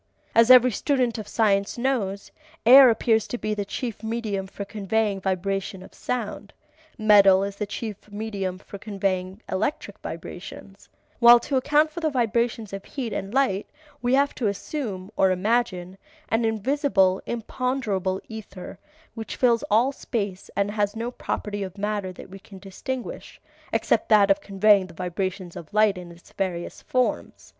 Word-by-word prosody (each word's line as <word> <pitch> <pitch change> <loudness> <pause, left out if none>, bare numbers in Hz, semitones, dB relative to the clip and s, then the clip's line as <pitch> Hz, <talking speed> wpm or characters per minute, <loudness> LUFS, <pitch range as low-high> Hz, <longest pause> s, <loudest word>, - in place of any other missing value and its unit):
As 230 +1 +5
every 255 0 +8
student 250 -1 0
of 215 - -7
science 200 -2 +1
knows, 230 -6 -2 0.3
air 260 +2 +10
appears 225 -1 +2
to 245 - -4
be 215 -2 -2
the 205 -1 -2
chief 225 +2 -5
medium 220 -4 -3
for 200 +1 -7
conveying 205 0 -1
vibration 190 0 -2
of - - -15
sound, 215 -4 -4 0.4
metal 200 -3 +6
is 200 0 -4
the 210 - -3
chief 215 -1 -7
medium 205 -3 -4
for 200 +1 -11
conveying 195 -1 -3
electric 210 +2 -2
vibrations, 195 +3 -9 0.3
while 240 0 +9
to 275 - -3
account 295 +4 +3
for 340 - -6
the 320 -2 0
vibrations 235 -4 -1
of 195 0 -5
heat 250 -6 -5
and 195 - -4
light 255 -6 +1 0.3
we 245 +2 +2
have 280 +1 +2
to 235 - -1
assume 200 -2 -4
(or 190 - +4
imagine) 185 -2 -1 0.3
an 225 +1 +1
invisible, 220 -4 +2
imponderable 225 -5 -2
ether 200 -4 -9 0.3
which 225 -1 -6
fills 235 -3 +3
all 230 +6 +3
space 205 -8 -4
and 200 0 0
has 205 0 -1
no 230 +2 -3
property 205 -4 -4
of 190 0 -6
matter 205 -2 -2
that 185 - -12
we 195 - -10
can 195 0 -14
distinguish 205 +7 -7 0.3
except - - +1
that 205 -2 +6
of 195 0 +2
conveying 200 -1 +3
vibrations 180 +1 -4
of 160 - -9
light 215 -1 +3
in 180 -1 -9
its 170 +1 -17
various 180 -3 -4
forms. 255 -1 -2
210 Hz, 155 wpm, -24 LUFS, 195-235 Hz, 0.4 s, air